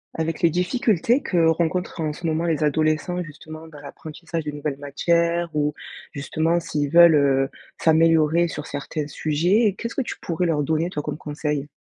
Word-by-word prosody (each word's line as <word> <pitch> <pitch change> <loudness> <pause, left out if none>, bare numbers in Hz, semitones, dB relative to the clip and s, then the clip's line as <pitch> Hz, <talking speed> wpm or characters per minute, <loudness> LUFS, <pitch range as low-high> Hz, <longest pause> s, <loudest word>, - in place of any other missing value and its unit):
Avec 160 +1 -3
les 170 - +5
difficultés 215 - +1
que 170 -8 +1
rencontrent, 170 +2 -1
en 155 -1 -1
ce 170 - -9
moment, 160 +1 0
les 160 -2 0
adolescents, 155 +4 0
justement, 155 0 -10
dans 150 -2 -13
l'apprentissage 160 +3 -7
de 150 - -4
nouvelles 145 -1 -4
matières 170 +3 0
ou, 150 0 0 0.4
justement, 160 +4 0
s'ils 145 -3 -2
veulent, 170 +1 +7
heu, 135 -2 +3 0.3
s'améliorer 165 +1 +3
sur 150 -2 -6
certains 145 +1 -4
sujets, 175 +9 +1
qu'est-ce 230 0 -5
que - - -1
tu 245 - -5
pourrais 175 +1 -2
leur 150 -3 +1
donner, 160 +4 0
toi, 150 -4 -4
comme - - -4
conseil? 150 -1 -3
160 Hz, 175 wpm, -23 LUFS, 150-170 Hz, 0.4 s, veulent